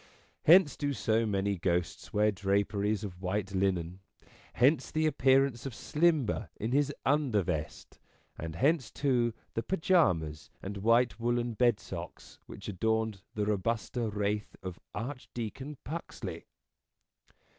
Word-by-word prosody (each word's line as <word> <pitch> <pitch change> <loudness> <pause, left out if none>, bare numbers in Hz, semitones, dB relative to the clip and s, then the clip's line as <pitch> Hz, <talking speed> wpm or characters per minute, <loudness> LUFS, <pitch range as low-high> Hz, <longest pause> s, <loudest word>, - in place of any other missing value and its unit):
Hence 170 -1 +7
do 145 -1 -1
so 115 -3 +1
many 100 -1 0
ghosts 90 -1 -1
wear 105 +1 +3
draperies 100 +1 0
of 90 -3 -7
white 100 +1 -2
linen; 95 -2 0 0.5
hence 135 +2 +3
the 155 0 0
appearance 135 -3 +3
of 125 - -7
Slimber 150 -5 +1
in 110 +3 -3
his 145 +1 +2
undervest; 105 - 0 0.4
and 80 -1 -6
hence, 140 - +2
too, 125 -5 +1 0.2
the 115 - -1
pyjamas 90 - +1
and 100 +1 -6
white 115 +4 +3
woollen 120 0 0
bedsocks 120 -1 -2
which - - -9
adorned 110 +1 0
the 105 -1 0
robuster 110 +3 -1
wraith 105 0 -2
of 95 -2 -6 0.2
Archdeacon 130 +3 -5
Puxley. 165 +5 -6
110 Hz, 120 wpm, -31 LUFS, 100-135 Hz, 0.5 s, Hence